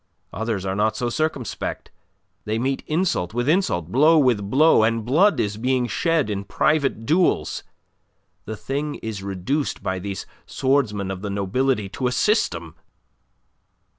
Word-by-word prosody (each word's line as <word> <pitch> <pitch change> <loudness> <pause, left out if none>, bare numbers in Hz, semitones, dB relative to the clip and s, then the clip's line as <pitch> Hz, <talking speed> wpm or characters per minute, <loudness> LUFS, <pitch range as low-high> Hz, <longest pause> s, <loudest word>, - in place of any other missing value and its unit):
Others 110 -3 -2
are 95 - -1
not 110 +1 +1
so 120 - -1
circumspect; 155 -4 -3 0.5
they 110 +1 -1
meet 130 +3 -1
insult 155 - 0
with 120 +1 0
insult, 120 - +1
blow 155 +7 +5
with 120 -9 +2
blow, 150 +2 +5
and 115 0 +1
blood 170 - +3
is 105 0 -1
being 125 +2 +1
shed 160 +5 +1
in 100 -2 -3
private 135 +1 0
duels. 175 +7 +1 0.8
The 110 +1 -5
thing 145 +5 -3
is 110 -3 -4
reduced 100 +10 -2
by 95 0 -2
these 95 0 -5 0.2
swordsmen 115 -8 0
of 95 -1 -6
the 105 - -4
nobility 105 +3 0
to 125 +5 -2
a - - 0
system." 85 - 0
115 Hz, 145 wpm, -23 LUFS, 100-140 Hz, 0.8 s, blow